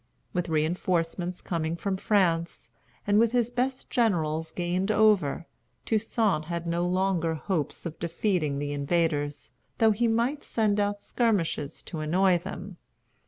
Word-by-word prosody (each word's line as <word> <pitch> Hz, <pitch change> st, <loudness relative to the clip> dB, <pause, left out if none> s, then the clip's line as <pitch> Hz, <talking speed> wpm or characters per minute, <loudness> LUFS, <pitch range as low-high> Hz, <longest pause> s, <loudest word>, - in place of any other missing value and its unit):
With 175 Hz, -1 st, -1 dB
reinforcements 170 Hz, +2 st, -1 dB
coming 165 Hz, -1 st, -2 dB
from 190 Hz, +3 st, -2 dB
France, 175 Hz, -4 st, 0 dB, 0.4 s
and 205 Hz, +1 st, +4 dB
with 230 Hz, +1 st, +3 dB
his 240 Hz, -1 st, +1 dB
best 255 Hz, +2 st, -2 dB
generals 160 Hz, -8 st, +1 dB
gained 180 Hz, +3 st, -1 dB
over, 205 Hz, -9 st, +3 dB, 0.4 s
Toussaint 215 Hz, -6 st, +1 dB
had 170 Hz, +1 st, -4 dB
no 170 Hz, +1 st, 0 dB
longer 180 Hz, -3 st, +1 dB
hopes 160 Hz, 0 st, -3 dB
of 165 Hz, -1 st, -6 dB
defeating 170 Hz, -3 st, 0 dB
the 145 Hz, 0 st, -2 dB
invaders, 145 Hz, -3 st, -1 dB, 0.3 s
though 225 Hz, -1 st, +5 dB
he 235 Hz, +3 st, +1 dB
might 235 Hz, +6 st, 0 dB
send 210 Hz, -2 st, +1 dB
out 205 Hz, 0 st, 0 dB
skirmishers 195 Hz, -, -1 dB
to 165 Hz, -, -6 dB
annoy 175 Hz, +4 st, +3 dB
them. 185 Hz, +1 st, -8 dB
180 Hz, 135 wpm, -27 LUFS, 165-210 Hz, 0.4 s, though